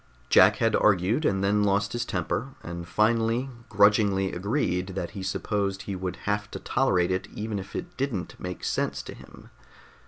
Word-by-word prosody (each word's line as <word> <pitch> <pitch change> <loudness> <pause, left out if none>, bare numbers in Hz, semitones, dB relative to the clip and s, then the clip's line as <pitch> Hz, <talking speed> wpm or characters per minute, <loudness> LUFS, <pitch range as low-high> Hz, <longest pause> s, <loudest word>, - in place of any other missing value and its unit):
Jack - - +7
had - - +2
argued, 105 - +3
and 95 0 +1
then 105 +1 +2
lost 100 0 +1
his 120 - -2
temper, 100 +8 -3
and 85 0 -6
finally 115 +6 +1 0.2
grudgingly 100 -2 +3
agreed 95 -2 -1
that 90 -3 -3
he 100 - -7
supposed 100 +1 -2
he 100 - -4
would 90 0 -4
have 105 0 -1
to - - -6
tolerate 95 -9 +1
it 95 +1 -1
even 105 -1 -3
if 95 - -9
it 175 - -5
didn't 125 -9 -2
make 90 -1 -6
sense - - -1
to - - -8
him. - - -15
100 Hz, 175 wpm, -27 LUFS, 95-110 Hz, 0.2 s, Jack